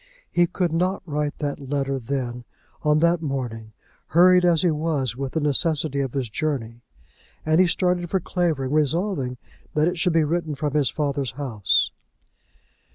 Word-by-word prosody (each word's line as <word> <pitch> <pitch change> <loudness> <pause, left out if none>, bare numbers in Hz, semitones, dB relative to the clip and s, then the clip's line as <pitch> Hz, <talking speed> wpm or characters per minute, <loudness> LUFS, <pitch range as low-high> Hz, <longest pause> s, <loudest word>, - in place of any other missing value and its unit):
He 175 0 +3
could 175 -1 -1
not 180 +3 0
write 150 -2 -2
that 140 -2 -4
letter 135 -1 -1
then, 125 -1 -4 0.4
on 150 -1 +3
that 170 0 +3
morning, 120 -7 -4 0.4
hurried 180 +2 +5
as 170 -2 +3
he 175 - +3
was 150 -6 -1
with 135 0 -4
the 160 - +1
necessity 150 0 +1
of 135 -3 -2
his 135 -3 -1
journey; 120 -3 -3 0.6
and 155 +3 +4
he 185 - +4
started 180 0 0
for 190 - +1
Clavering 160 -7 -1
resolving 155 -3 0 0.4
that 155 +1 +3
it 175 -1 -1
should 180 -1 +2
be 165 -1 +4
written 160 0 -1
from 145 +1 -2
his 145 -5 +2
father's 140 -3 -2
house. 120 -8 +1
150 Hz, 160 wpm, -23 LUFS, 135-170 Hz, 0.6 s, hurried